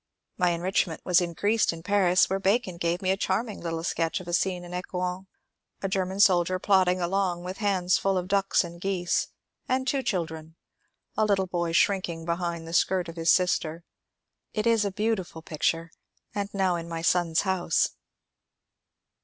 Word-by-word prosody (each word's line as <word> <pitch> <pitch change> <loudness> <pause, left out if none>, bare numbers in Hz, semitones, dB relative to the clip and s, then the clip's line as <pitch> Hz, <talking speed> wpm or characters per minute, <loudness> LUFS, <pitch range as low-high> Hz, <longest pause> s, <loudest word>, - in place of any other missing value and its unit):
My 180 -2 +2
enrichment 175 0 0
was 180 0 +4
increased 205 +6 +1
in 165 0 -9
Paris, 185 -2 +3
where 195 +1 -1
Bacon 195 -2 +1
gave 170 +2 -1
me 185 - +2
a - - +2
charming 205 +2 -2
little 165 -1 -3
sketch 165 -1 -1
of 185 - -11
a 175 - -4
scene 180 0 0
in 175 0 -9
Ecouen, 180 +1 -4 0.3
— - - -51
a - - +1
German 190 0 -2
sol 185 -4 +6
dier 185 +2 -2
plodding 185 -1 +3
along 180 0 0
with 185 +2 -6
hands 185 -4 +1
full 195 -1 +1
of 180 0 -2
ducks 195 0 +2
and 170 0 -9
geese, 185 -2 0 0.4
and 260 +1 0
two 275 0 +1
children, 160 -7 -3 0.3
— - - -48
a - - +4
little 200 -3 +2
boy 175 -2 -2
shrinking 170 -2 +1
behind 170 -1 -2
the 165 - -7
skirt 180 -1 +2
of 165 - -8
his 165 0 0
sister. 170 -2 +2 0.7
It 215 0 -1
is 230 -2 +3
a 200 - -1
beautiful 190 -6 -2
picture, 165 +1 -1 0.4
and 200 0 -3
now 190 -3 +1
in 170 0 -7
my 165 -1 -4
son's 170 -2 +2
house. 190 -4 +1
180 Hz, 180 wpm, -27 LUFS, 170-195 Hz, 0.7 s, sol